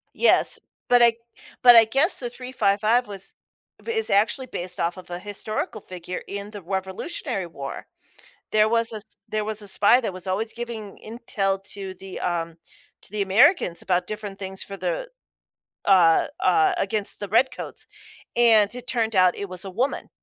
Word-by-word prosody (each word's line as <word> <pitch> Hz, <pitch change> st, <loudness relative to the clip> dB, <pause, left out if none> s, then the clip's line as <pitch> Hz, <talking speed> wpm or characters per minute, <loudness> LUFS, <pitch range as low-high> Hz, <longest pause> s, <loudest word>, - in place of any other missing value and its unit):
Yes, 475 Hz, -, +3 dB, 0.3 s
but 245 Hz, -1 st, +6 dB
I 235 Hz, -1 st, +6 dB, 0.5 s
but 245 Hz, -1 st, +9 dB
I 225 Hz, -, +9 dB
guess 270 Hz, -, +1 dB
The 245 Hz, -2 st, -4 dB
355 235 Hz, -2 st, +1 dB
was 195 Hz, -2 st, -9 dB, 0.5 s
is 445 Hz, -1 st, -1 dB
actually 215 Hz, +6 st, +2 dB
based 180 Hz, -5 st, -5 dB
off 170 Hz, +2 st, 0 dB
of 185 Hz, -1 st, -12 dB
a 175 Hz, -, -4 dB
historical 210 Hz, +2 st, -4 dB
figure 180 Hz, -1 st, -7 dB
in 200 Hz, +1 st, -6 dB
the 205 Hz, -3 st, -9 dB
Revolutionary 190 Hz, -, -4 dB
War. 140 Hz, -3 st, -7 dB, 0.7 s
There 215 Hz, 0 st, +4 dB
was 230 Hz, 0 st, +1 dB
a -, -, -4 dB
s 210 Hz, 0 st, -6 dB
there 215 Hz, 0 st, -2 dB
was 215 Hz, 0 st, -2 dB
a 205 Hz, -, -9 dB
spy 205 Hz, +6 st, +4 dB
that 205 Hz, -, -3 dB
was 185 Hz, +1 st, -7 dB
always 210 Hz, +4 st, -1 dB
giving 235 Hz, -4 st, -6 dB
intel 205 Hz, -4 st, -2 dB
to 195 Hz, -2 st, -6 dB
the 190 Hz, 0 st, -9 dB
um, 170 Hz, -2 st, -2 dB, 0.4 s
to -, -, -8 dB
the 210 Hz, -1 st, -2 dB
Americans 195 Hz, -, +4 dB
about 180 Hz, -1 st, 0 dB
different 210 Hz, -2 st, -6 dB
things 190 Hz, -1 st, -4 dB
for 195 Hz, -, -8 dB
the -, -, -3 dB, 0.8 s
uh, 175 Hz, -5 st, +5 dB
uh, 390 Hz, -2 st, +3 dB
against 215 Hz, -11 st, -2 dB
the 205 Hz, -, -4 dB
redcoats, 230 Hz, +6 st, 0 dB, 0.5 s
and 225 Hz, -3 st, +5 dB
it 250 Hz, 0 st, -9 dB
turned 225 Hz, -4 st, 0 dB
out 185 Hz, -1 st, +5 dB
it 200 Hz, -, -5 dB
was 185 Hz, +1 st, -8 dB
a -, -, -5 dB
woman. 250 Hz, +9 st, -2 dB
210 Hz, 170 wpm, -24 LUFS, 190-235 Hz, 0.8 s, but